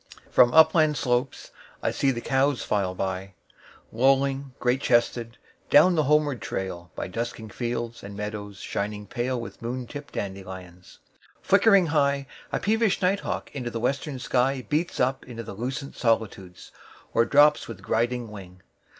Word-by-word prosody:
1From 120 - +7
upland 160 -1 +5
slopes 125 +1 -1 0.3
I - - +1
see 140 - +1
the 120 -3 -1
cows 135 +1 +1
file 95 -3 -1
by,2Lowing, 130 +8 -2
great 125 +2 +1
chested, 120 -1 +1 0.3
down 180 +5 +7
the 155 -3 +2
homeward 145 -3 +2
trail,3By 90 -1 -5
dusking 115 0 -4
fields 120 +1 -4
and 100 0 -9
meadows 105 -1 -5
shining 105 +2 -4
pale4With 120 +2 -4
moon 125 +2 -4
tipped 145 +5 -9
dandelions. 95 -2 -7 0.5
Flickering 200 -5 +5
high,5A 140 -2 -1
peevish 220 -1 +2
night 190 +2 +3
hawk - - -4
in 135 - -4
the 115 - -3
western 140 +4 -1
sky6Beats 135 +6 0
up 130 +1 +1
into 115 -2 -7
the 110 - -8
lucent 130 +6 -5
solitudes,7Or 110 0 -2
drops 145 +1 +5
with 115 - -9
griding 120 0 -1
wing. 90 -3 -11
120 Hz, 135 wpm, -26 LUFS, 105-140 Hz, 0.5 s, 1From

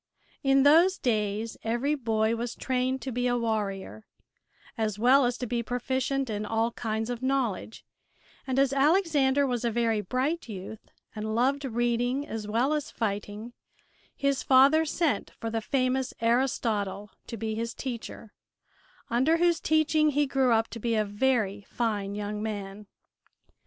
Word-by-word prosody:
In 270 0 +4
those 335 +6 +5
days 215 -1 -1
every 240 +6 0
boy 225 -4 0
was 235 0 -4
trained 260 0 -1
to 265 - -4
be 245 +1 0
a 245 0 +1
warrior, 215 -2 -3 0.7
as 215 -2 -2
well 255 +4 +5
as 245 0 -1
to 250 - -4
be 240 0 -1
proficient 260 +3 -1
in 210 -2 -3
all 225 +2 0
kinds 225 0 -3
of 240 0 -5
knowledge, 260 -6 -2 0.6
and 260 0 -1
as 275 0 +3
Alexander 285 -2 +3
was 245 -3 -2
a 235 - +1
very 225 -2 +1
bright 255 - -2
youth 205 +1 -8 0.3
and 215 0 -3
loved 275 +4 +1
reading 240 +2 0
as 220 -2 -5
well 240 +7 +1
as 300 -2 -2
fighting 210 +1 -4 0.6
his 280 -1 0
father 275 +5 +5
sent 320 0 -1
for 225 - -4
the 225 0 -1
famous 255 +1 0
Aristotle 225 -4 0 0.2
to 230 - -6
be 220 +1 -3
his 230 +1 -4
teacher, 235 -4 -7 0.8
under 265 +8 +3
whose 340 -1 +2
teaching 310 0 +2
he 295 0 +2
grew 265 -2 +1
up 225 0 +3
to 230 - -7
be 230 +1 0
a 215 -1 +1
very 205 -1 0
fine 205 -4 -2
young 210 0 -4
man. 205 -1 -5
240 Hz, 155 wpm, -28 LUFS, 220-270 Hz, 0.8 s, those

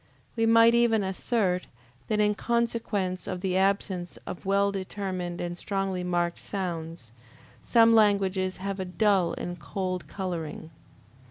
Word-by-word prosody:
We 225 -1 +2
might 230 +1 +6
even 235 -3 +3
assert, 190 -1 0 0.4
that 215 -1 0
in 210 0 +3
consequence 220 -5 -1
of 185 -2 -4
the 185 -1 -1
absence 190 -2 0
of 180 - -7
well 200 +1 +3
determined 185 -2 -4
and 175 0 -3
strongly 195 0 -2
marked 175 -1 -1
sounds, 165 - -5 0.5
some 230 -1 +5
languages 195 -3 +3
have 195 +1 -4
a 190 - -2
dull 190 -1 +2
and 175 0 -5
cold 185 +4 -4
coloring. 165 -4 -5
190 Hz, 135 wpm, -27 LUFS, 180-210 Hz, 0.5 s, might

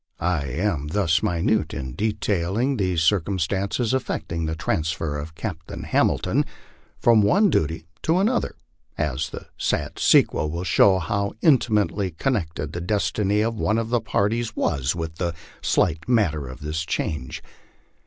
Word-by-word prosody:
I 85 -4 0
am 80 +1 -1
thus 85 0 +2
minute 95 -2 0
in 65 -2 -5
detailing 105 - 0
these 90 -5 +1
circumstances 100 +6 +1
affecting 85 -10 -2
the 80 - -2
transfer 80 -2 -1
of 80 +2 -8
Captain 85 -5 -6
Hamilton - - +2 0.5
from 115 -2 +5
one 195 - +4
duty 80 - 0 0.2
to 165 +2 +2
an 195 +3 +3
other, 245 0 -1 0.4
as 75 0 -1
the - - -8
sad - - -1
sequel 75 - +4
will 85 +3 -3
show 95 +1 +5
how 100 +3 -1
intimately 105 - +3
connected 80 - -2
the 85 - -4
destiny 105 +2 +1
of 115 0 -1
one 110 - +1
of 115 -1 -1
the 120 -1 +1
parties 110 +1 0
was 70 -3 0
with 80 -1 -5
the 85 -2 -2 0.3
slight 80 +4 +1
matter 85 - +2
of 65 +4 -9
this 75 +2 -2
change. 75 -5 -3
90 Hz, 145 wpm, -24 LUFS, 80-110 Hz, 0.5 s, from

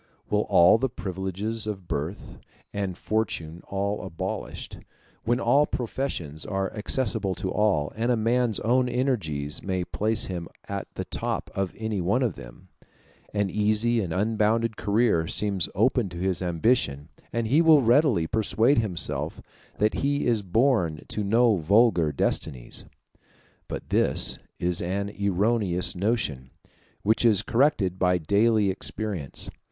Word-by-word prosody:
When - - +2
all 90 +6 +5
the 135 +2 0
privileges 100 +2 -3
of 95 -4 -5
birth 80 +8 -5 0.3
and 95 -3 -3
fortune 85 -7 -2
are 100 +1 -2
abolished, 95 -4 -5 0.5
when 120 +2 +1
all 145 +2 +3
professions 105 - -3
are 95 -1 -2
accessible 105 -3 -1
to 95 - -3
all, 100 -9 +1
and 115 +3 0
a 120 - +2
man's 115 0 +1
own 125 +2 +2
energies 95 - -1
may 95 -2 -2
place 110 +4 +1
him 85 -3 -5 0.2
at - - -4
the - - -4
top - - -3
of 95 -2 -2
any 110 -3 -2
one 100 +9 +1
of 115 -7 0
them, - - -13 0.6
an 100 -2 -1
easy 110 +2 +1
and 90 -5 -4
unbounded 110 +3 +1
career 105 -6 +1
seems 100 -3 -1
open 115 +1 +2
to 85 - -9
his 95 +1 -1
ambition, 85 - +1 0.2
and 115 0 -1
he 140 +9 +4
will 160 -4 +6
readily 120 - +4
persuade 110 - +2
himself 100 -7 0 0.4
that 105 +1 +2
he 140 +1 0
is 115 -3 +2
born 95 - +1
to 105 - -2
no 115 +1 +3
vulgar 90 -2 +3
destinies. 65 -3 -2 0.8
But - - -6
this - - +2 0.2
is 90 -1 -1
an 100 +3 -2
erroneous 100 -2 +1
notion, 90 - -1 0.5
which 110 +3 +2
is 105 -4 +4
corrected 115 - +1
by 90 -1 +3
daily 100 +4 +2
experience. 95 -6 -3
105 Hz, 140 wpm, -26 LUFS, 90-115 Hz, 0.8 s, will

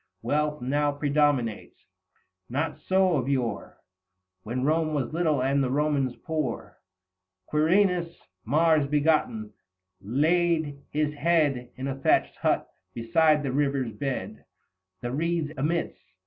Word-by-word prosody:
Wealth 150 +2 -1
now 145 +3 +1
predominates; 145 -6 0 0.6
not 145 +5 -2
so 185 -3 +2
of 130 0 -2
yore 125 -6 -2 0.6
When 120 +5 -3
Rome 155 +1 +1
was 135 -1 -2
little 155 -6 +1
and 135 +1 +2
the 130 - 0
Romans 140 -2 0
poor. 155 -7 -3 0.7
Quirinus, 170 - +2 0.3
Mars 155 +3 +3
begotten, 140 -8 +1 0.5
laid 155 - +1
his 150 0 -1
head 145 -5 +1
In 130 +1 -5
a 135 - -1
thatched 135 - +1
hut, - - 0 0.3
beside 150 +6 +3
the 135 - -2
river's 135 -3 0
bed 135 +5 -4
210 - - -27 0.6
The 120 - -3
reeds 160 +2 -1
amidst. 160 +5 -2
145 Hz, 120 wpm, -26 LUFS, 130-160 Hz, 0.7 s, Mars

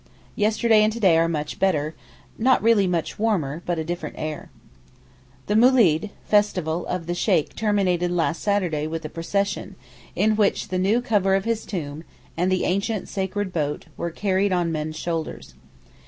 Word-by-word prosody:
Yesterday 220 +1 +3
and 215 +1 +3
to 235 - -6
day 190 -7 +5
are 165 +1 +3
much 150 -2 -3
better, 155 -5 +1 0.4
not 255 +1 +3
really 220 -4 +4
much 175 0 -2
warmer, 175 -9 0
but 175 -1 0
a 160 - -1
different 165 -2 -5
air. 155 -1 -5 1.0
The 210 - -1
moolid 220 -8 +4 0.2
(festival) 180 -6 +1
of 180 -2 -3
the 175 - -2
Sheykh 175 -3 +1
terminated 190 -5 +1
last 170 -1 0
Saturday 180 -7 0
with 160 0 -5
a - - -4
procession, 200 +5 -2 0.4
in 215 0 +2
which 210 -2 +1
the 185 0 -1
new 205 +6 +2
cover 200 -6 +2
of 195 - -1
his 230 -1 -2
tomb, 155 -4 -5 0.3
and 180 +3 0
the 185 - +1
ancient 200 +3 -1
sacred 190 0 -3
boat, 150 -3 -2
were 170 - -3
carried 195 +3 0
on 175 -2 +1
men's 155 0 -3
shoulders. 165 -1 -4
185 Hz, 170 wpm, -23 LUFS, 165-210 Hz, 1.0 s, day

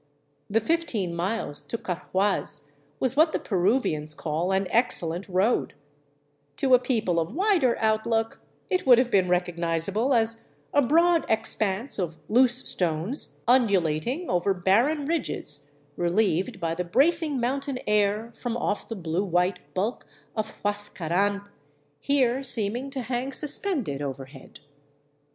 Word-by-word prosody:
The 215 +2 +3
fifteen 230 - -1
miles 180 -3 -3
to 230 - -3
Carhuaz 185 -4 -2 0.4
was 260 0 0
what 315 +2 +4
the - - +2
Peruvians 180 - 0
call 160 +5 -2
an 190 0 +1
excellent 185 -6 +1
road; 190 +6 +1 0.8
to 265 -2 +2
a 250 - +8
people 225 -9 0
of 165 - -3
wider 355 - +2
outlook 225 +1 0 0.3
it 365 -6 -1
would 245 -2 +8
have 250 0 +1
been 185 -2 +3
recognizable 180 +7 0
as 230 0 0 0.3
a 285 - +5
broad 335 +5 +3
expanse 220 +1 0
of 165 -3 -3
loose 250 +2 +3
stones 175 - -1
undulating 230 - +2
over 180 +2 +1
barren 235 - +2
ridges, 145 - -2 0.2
relieved 180 0 0
by 165 -1 -1
the 180 +2 -2
bracing 290 - +2
mountain 270 +2 -2
air 210 +2 +1
from 240 -1 -3
off 205 -3 -2
the 225 - -5
blue 170 0 -2
white 180 0 0 0.2
bulk 210 +6 -2 0.3
of 215 -1 -3
Huascaran, 200 -1 0 0.6
here 265 - +1
seeming 245 0 -1
to 270 -1 -4
hang 250 +3 -3
suspended 280 - +1
over 135 -1 -5
head. 135 0 -15
215 Hz, 135 wpm, -26 LUFS, 180-255 Hz, 0.8 s, a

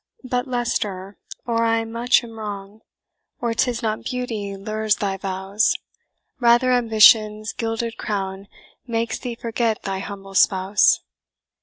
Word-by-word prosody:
"But, 250 0 -2
Leicester 210 -6 -2 0.3
(or 230 -1 +1
I 225 0 +2
much 235 +3 +2
am 225 -1 -10
wrong), 205 0 -7 0.6
Or 235 -1 -1
'tis 240 +1 0
not 215 -1 -1
beauty 225 -6 -4
lures 215 +1 0
thy 195 -2 -2
vows; 195 +2 0 0.6
Rather 240 +1 +4
ambition's 215 -2 +5
gilded 225 0 -3
crown 195 -1 -3 0.4
Makes 230 -1 -2
thee 245 -2 -5
forget 230 -1 -1
thy 195 -1 -3
humble 195 0 -8
spouse. 190 +1 +4
220 Hz, 125 wpm, -22 LUFS, 200-235 Hz, 0.6 s, ambition's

